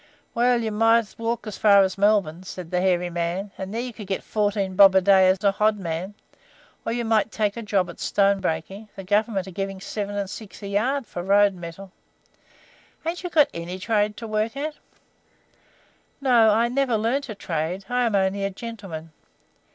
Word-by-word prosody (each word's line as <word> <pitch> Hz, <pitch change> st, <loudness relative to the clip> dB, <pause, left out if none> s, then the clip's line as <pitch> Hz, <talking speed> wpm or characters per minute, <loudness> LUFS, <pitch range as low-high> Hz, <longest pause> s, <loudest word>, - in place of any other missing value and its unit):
"Well, 240 Hz, 0 st, +2 dB
you 220 Hz, -, -2 dB
might 225 Hz, 0 st, +3 dB
walk 230 Hz, +1 st, -2 dB
as 215 Hz, -2 st, -7 dB
far 200 Hz, -2 st, +6 dB
as 190 Hz, -1 st, -1 dB
Melbourne," 200 Hz, -5 st, +2 dB
said 185 Hz, -2 st, -8 dB
the 180 Hz, 0 st, +1 dB
hairy 180 Hz, -1 st, +1 dB
man, 175 Hz, +4 st, -3 dB
"and 190 Hz, 0 st, -6 dB
then 230 Hz, +3 st, -2 dB
you 250 Hz, -, -7 dB
could 210 Hz, -3 st, -9 dB
get 190 Hz, -, -3 dB
fourteen 205 Hz, -3 st, -1 dB
bob 195 Hz, -1 st, +7 dB
a 190 Hz, -, +6 dB
day 190 Hz, 0 st, +5 dB
as 185 Hz, -, +3 dB
a 200 Hz, -, +4 dB
hodman; 195 Hz, -3 st, -1 dB, 0.7 s
or -, -, -2 dB
you 235 Hz, 0 st, -2 dB
might 220 Hz, -1 st, +2 dB
take 210 Hz, -2 st, -1 dB
a 235 Hz, -, -5 dB
job 200 Hz, -4 st, 0 dB
at 175 Hz, -, -11 dB
stone 200 Hz, 0 st, +2 dB
breaking; 190 Hz, +5 st, -4 dB
the 195 Hz, -, -8 dB
Government 205 Hz, 0 st, 0 dB
are 190 Hz, -, -9 dB
giving 195 Hz, +1 st, -4 dB
7s. 205 Hz, +1 st, -4 dB
6d. 200 Hz, +1 st, -10 dB
a -, -, -5 dB
yard 250 Hz, +7 st, 0 dB
for 175 Hz, -, -6 dB
road 200 Hz, +2 st, +4 dB
metal. 180 Hz, +2 st, -9 dB, 1.1 s
Ain't 335 Hz, +2 st, -3 dB
you 355 Hz, -, -3 dB
got 310 Hz, -4 st, +4 dB
any 170 Hz, +2 st, -5 dB
trade 210 Hz, +1 st, 0 dB
to 230 Hz, -, -7 dB
work 215 Hz, +4 st, -1 dB
at?" 300 Hz, +2 st, -3 dB, 1.5 s
"No, 245 Hz, -5 st, +5 dB
I 225 Hz, +3 st, +3 dB
never 250 Hz, -2 st, +1 dB
learned 235 Hz, +6 st, -1 dB
a 215 Hz, -, -5 dB
trade, 175 Hz, +1 st, -3 dB
I 245 Hz, 0 st, 0 dB
am 220 Hz, -, 0 dB
only 195 Hz, +1 st, +1 dB
a 195 Hz, -, 0 dB
gentleman." 195 Hz, -7 st, -8 dB
205 Hz, 190 wpm, -24 LUFS, 190-225 Hz, 1.5 s, bob